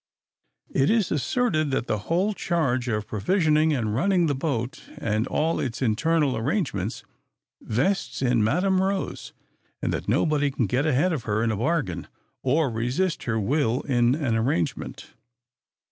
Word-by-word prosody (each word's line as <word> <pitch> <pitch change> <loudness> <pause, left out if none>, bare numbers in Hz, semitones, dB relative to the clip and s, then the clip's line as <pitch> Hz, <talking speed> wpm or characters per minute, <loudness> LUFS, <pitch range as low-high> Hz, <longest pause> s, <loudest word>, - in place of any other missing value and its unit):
It 135 - +3
is 220 -3 +2
asserted 155 - +1
that 135 -3 -1
the 105 - -1
whole 185 +6 +2
charge 135 -10 0
of 105 -3 -1
provisioning 155 - +2
and 115 -7 0
running 180 - +2
the 150 - +1
boat, 135 0 -2 0.2
and 110 +2 -1
all 160 +2 0
its 120 -3 -3
internal 135 +4 +1
arrangements, 115 - -2 0.6
vests 135 - -1
in 120 -3 +3
Madam 185 - +2
Rose; 195 0 -2 0.5
and - - -1
that - - -3
nobody 145 -2 +2
can 130 -3 -1
get 130 +10 0
ahead 155 +5 +2
of 140 -7 -4
her 110 +1 0
in 115 - +1
a 110 - -2
bargain, 115 - -1 0.3
or 145 +4 +2
resist 125 +11 -1
her 110 -2 0
will 125 +2 +1
in 120 -1 +2
an 140 -7 0
arrangement. 110 - -2
135 Hz, 150 wpm, -25 LUFS, 115-165 Hz, 0.6 s, It